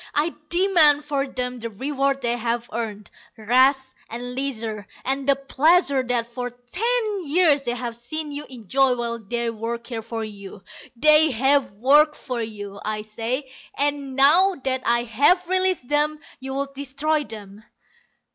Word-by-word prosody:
I 310 Hz, +3 st, +1 dB, 0.2 s
demand 335 Hz, -5 st, +4 dB
for 280 Hz, -2 st, -1 dB
them 250 Hz, -1 st, -4 dB
the 230 Hz, 0 st, -5 dB
reward 275 Hz, +4 st, -1 dB
they 240 Hz, 0 st, +1 dB
have 235 Hz, 0 st, -2 dB
earned 215 Hz, -3 st, -5 dB, 0.3 s
rest 260 Hz, +4 st, +3 dB, 0.2 s
and 245 Hz, +2 st, -6 dB
leisure, 225 Hz, -6 st, -4 dB, 0.2 s
and 270 Hz, +1 st, -1 dB
the 275 Hz, -, +6 dB
pleasures 275 Hz, 0 st, +2 dB
that 240 Hz, -2 st, +1 dB
for 245 Hz, +1 st, -5 dB
ten 400 Hz, -, -2 dB
years 305 Hz, -2 st, +3 dB
they 240 Hz, -2 st, -2 dB
have 240 Hz, -1 st, -5 dB
seen 295 Hz, +6 st, -6 dB
you 290 Hz, +1 st, -6 dB
enjoy 255 Hz, +2 st, +1 dB
while 235 Hz, -1 st, -3 dB
they 235 Hz, +2 st, -2 dB
worked 230 Hz, +2 st, -5 dB
here 230 Hz, -3 st, -4 dB
for 225 Hz, 0 st, -5 dB
you. 200 Hz, -2 st, -10 dB, 0.3 s
They 305 Hz, +4 st, +5 dB
have 270 Hz, -1 st, +2 dB
worked 290 Hz, +8 st, +4 dB
for 250 Hz, -3 st, -4 dB
you, 205 Hz, -3 st, -7 dB
I 215 Hz, 0 st, -3 dB
say, 235 Hz, +5 st, -4 dB, 0.3 s
and 280 Hz, -1 st, -1 dB
now 340 Hz, +8 st, +5 dB
that 260 Hz, -1 st, -1 dB
I 235 Hz, 0 st, +3 dB
have 290 Hz, -, +2 dB
released 370 Hz, -6 st, 0 dB
them 295 Hz, +2 st, +1 dB, 0.2 s
you 265 Hz, 0 st, -6 dB
would 275 Hz, 0 st, -3 dB
destroy 285 Hz, +3 st, -1 dB
them. 210 Hz, -4 st, -10 dB
260 Hz, 155 wpm, -23 LUFS, 235-290 Hz, 0.3 s, the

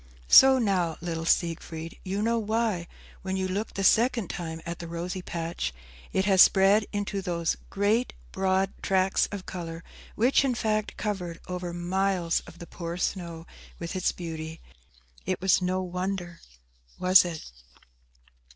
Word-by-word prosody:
So 265 Hz, 0 st, +9 dB
now, 185 Hz, -8 st, +1 dB
little 165 Hz, -1 st, -4 dB
Siegfried, 165 Hz, -1 st, -1 dB
you 195 Hz, +2 st, -2 dB
know 230 Hz, +1 st, +2 dB
why, 215 Hz, -5 st, -1 dB, 0.3 s
when 190 Hz, 0 st, -3 dB
you 190 Hz, 0 st, -1 dB
looked 200 Hz, +4 st, -3 dB
the 195 Hz, -, -2 dB
second 230 Hz, 0 st, +3 dB
time 160 Hz, -2 st, -5 dB
at 170 Hz, 0 st, -5 dB
the 170 Hz, -, -6 dB
rosy 175 Hz, +3 st, -4 dB
patch, 165 Hz, -, -3 dB, 0.4 s
it 190 Hz, -, +1 dB
has 190 Hz, -2 st, +5 dB
spread 200 Hz, +2 st, +5 dB
into 205 Hz, -1 st, -2 dB
those 170 Hz, -3 st, -1 dB
great 210 Hz, +5 st, +1 dB, 0.2 s
broad 190 Hz, 0 st, +1 dB
tracts 190 Hz, 0 st, +2 dB
of 200 Hz, -2 st, -7 dB
colour 165 Hz, -2 st, -6 dB, 0.3 s
which, 250 Hz, +6 st, +3 dB
in 260 Hz, -3 st, +1 dB
fact, 215 Hz, -2 st, -1 dB
covered 180 Hz, -6 st, -3 dB
over 180 Hz, -1 st, -4 dB
miles 175 Hz, 0 st, 0 dB
of 170 Hz, -, -12 dB
the 170 Hz, -, -9 dB
poor 170 Hz, 0 st, -6 dB
snow 170 Hz, -3 st, -3 dB, 0.3 s
with 170 Hz, +2 st, -5 dB
its 185 Hz, -, +1 dB
beauty. 160 Hz, -1 st, -6 dB, 0.7 s
It 185 Hz, -1 st, -1 dB
was 190 Hz, 0 st, +3 dB
no 185 Hz, +1 st, 0 dB
wonder, 180 Hz, -1 st, -4 dB, 0.6 s
was 185 Hz, +1 st, +6 dB
it?" 165 Hz, -, -6 dB
185 Hz, 150 wpm, -27 LUFS, 170-200 Hz, 0.7 s, So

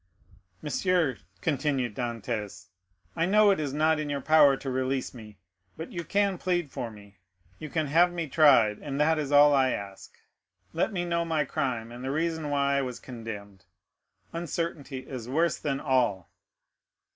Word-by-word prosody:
"Monsieur," 160 Hz, -2 st, 0 dB, 0.2 s
continued 140 Hz, -6 st, 0 dB
Dantès, 110 Hz, -6 st, -4 dB, 0.5 s
"I 165 Hz, +1 st, +1 dB
know 210 Hz, +1 st, +5 dB
it 195 Hz, -, +1 dB
is 145 Hz, -3 st, -2 dB
not 155 Hz, +2 st, +2 dB
in 150 Hz, -1 st, -3 dB
your 140 Hz, -1 st, -2 dB
power 145 Hz, -1 st, +5 dB
to 135 Hz, -, -6 dB
release 130 Hz, +1 st, -1 dB
me; 105 Hz, -4 st, -12 dB, 0.4 s
but 160 Hz, -, -7 dB
you 170 Hz, -2 st, -4 dB
can 200 Hz, 0 st, 0 dB
plead 175 Hz, -5 st, -1 dB
for 120 Hz, -, -4 dB
me—you 100 Hz, -, -14 dB
can 155 Hz, +1 st, -1 dB
have 170 Hz, +5 st, +4 dB
me 170 Hz, -2 st, -3 dB
tried—and 135 Hz, -2 st, +3 dB
that 160 Hz, +1 st, +3 dB
is 145 Hz, -2 st, -3 dB
all 145 Hz, 0 st, +7 dB
I 135 Hz, -2 st, +4 dB
ask. 100 Hz, -1 st, -8 dB, 0.6 s
Let 175 Hz, -, 0 dB
me 175 Hz, -3 st, -2 dB
know 170 Hz, -1 st, 0 dB
my 160 Hz, -3 st, 0 dB
crime, 125 Hz, -6 st, -3 dB
and 120 Hz, +1 st, -9 dB
the 130 Hz, -, -3 dB
reason 160 Hz, +1 st, -1 dB
why 140 Hz, -1 st, +1 dB
I -, -, +2 dB
was 125 Hz, -2 st, -5 dB
condemned. 105 Hz, -5 st, -9 dB, 0.7 s
Uncertainty 165 Hz, -5 st, -4 dB
is 125 Hz, -3 st, -7 dB
worse 165 Hz, +4 st, +1 dB
than 140 Hz, -2 st, -2 dB
all." 125 Hz, -, 0 dB
140 Hz, 160 wpm, -27 LUFS, 120-160 Hz, 0.7 s, all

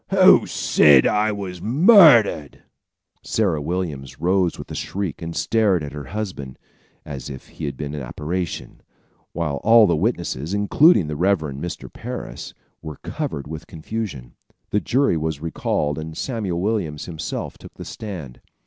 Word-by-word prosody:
"Who -, -, +6 dB
said 70 Hz, -4 st, +5 dB
I 105 Hz, +1 st, +2 dB
was 95 Hz, -4 st, -6 dB
murdered?" 135 Hz, -, +5 dB, 0.6 s
Sarah 95 Hz, -9 st, 0 dB
Williams 75 Hz, -4 st, -4 dB
rose 90 Hz, 0 st, +1 dB
with -, -, -9 dB
a -, -, -5 dB
shriek 95 Hz, -5 st, -4 dB
and 85 Hz, 0 st, -5 dB
stared 105 Hz, -7 st, +2 dB
at 70 Hz, -, -6 dB
her 75 Hz, -1 st, -7 dB
husband, 90 Hz, -8 st, -6 dB, 0.5 s
as 70 Hz, -2 st, -7 dB
if 65 Hz, -, -10 dB
he -, -, -7 dB
had 70 Hz, -2 st, -4 dB
been 75 Hz, -1 st, -5 dB
an 75 Hz, -, -5 dB
apparition, 80 Hz, +7 st, -5 dB, 0.5 s
while 75 Hz, -4 st, -2 dB
all 115 Hz, +4 st, +6 dB
the 85 Hz, -, +2 dB
witnesses, 85 Hz, -, -2 dB
including 105 Hz, -, +4 dB
the 75 Hz, 0 st, -4 dB
Rev. 95 Hz, +6 st, +3 dB
Mr. 75 Hz, +3 st, -6 dB
Parris, 125 Hz, +2 st, -7 dB, 0.3 s
were 75 Hz, -3 st, -8 dB
covered 70 Hz, -, -4 dB
with 80 Hz, +2 st, -8 dB
confusion. 80 Hz, -, -6 dB, 0.4 s
The 105 Hz, -, +2 dB
jury 130 Hz, -8 st, +2 dB
was 80 Hz, -2 st, -2 dB
recalled 75 Hz, -1 st, -2 dB
and 80 Hz, 0 st, -7 dB
Samuel 105 Hz, -9 st, -3 dB
Williams 90 Hz, -7 st, -2 dB
himself 80 Hz, -3 st, -5 dB
took -, -, -13 dB
the -, -, -9 dB
stand. 85 Hz, -, -8 dB
85 Hz, 150 wpm, -22 LUFS, 75-105 Hz, 0.6 s, Who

